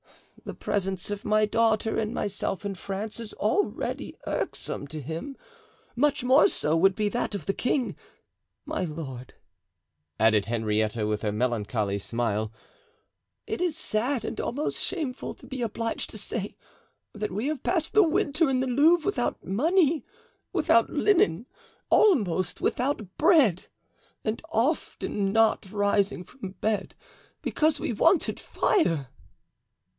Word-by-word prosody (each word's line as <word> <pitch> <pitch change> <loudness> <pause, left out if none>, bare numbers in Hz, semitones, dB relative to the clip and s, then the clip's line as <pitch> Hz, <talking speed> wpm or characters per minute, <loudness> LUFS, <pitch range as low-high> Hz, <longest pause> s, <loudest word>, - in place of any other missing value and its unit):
The - - -6
presence 190 -1 -2
of 205 0 -4
my 215 0 +3
daughter 220 0 +1
and 215 -1 -1
myself 200 -2 -3
in 200 - -2
France 200 +4 -5
is 230 -2 -6
already 310 - -1
irksome 145 - -3
to 155 +2 -6
him; 165 - -6 0.6
much 280 +1 +2
more 260 +7 +6
so 155 - 0
would 190 +3 +4
be 210 0 0
that 225 -1 -2
of 190 - -5
the 195 - 0
king. 250 +3 0 0.7
My - - -2
lord," 145 -7 -6 0.8
added 110 -2 +4
Henrietta, 110 -1 0
with 105 0 -1
a 105 - 0
melancholy 105 -3 -1
smile, 110 0 -1 0.9
"it - - -3
is 345 -4 0
sad 240 +2 -1
and - - -3
almost 285 +5 -2
shameful 305 -9 -3
to - - -16
be 260 -2 -6
obliged 230 0 -2
to - - -8
say - - -4 0.6
that 210 0 -3
we 210 +6 -2
have 295 -3 -2
passed 330 -4 0
the 430 - +7
winter 315 -3 +2
in 260 -1 +1
the 260 - 0
Louvre 300 +6 +4
without 405 - -1
money, 315 - +2 0.5
without - - +3
linen, 235 - +2 0.5
almost 195 - +3
without 240 -7 -1
bread, 280 - +4 0.6
and 220 +1 -1
often 230 -7 0
not 220 -2 +2
rising 200 -2 +1
from 195 -4 -9
bed 215 -2 -1 0.5
because 310 0 +1
we - - -2
wanted 330 - +3
fire." 165 - +1
215 Hz, 135 wpm, -27 LUFS, 165-275 Hz, 0.9 s, the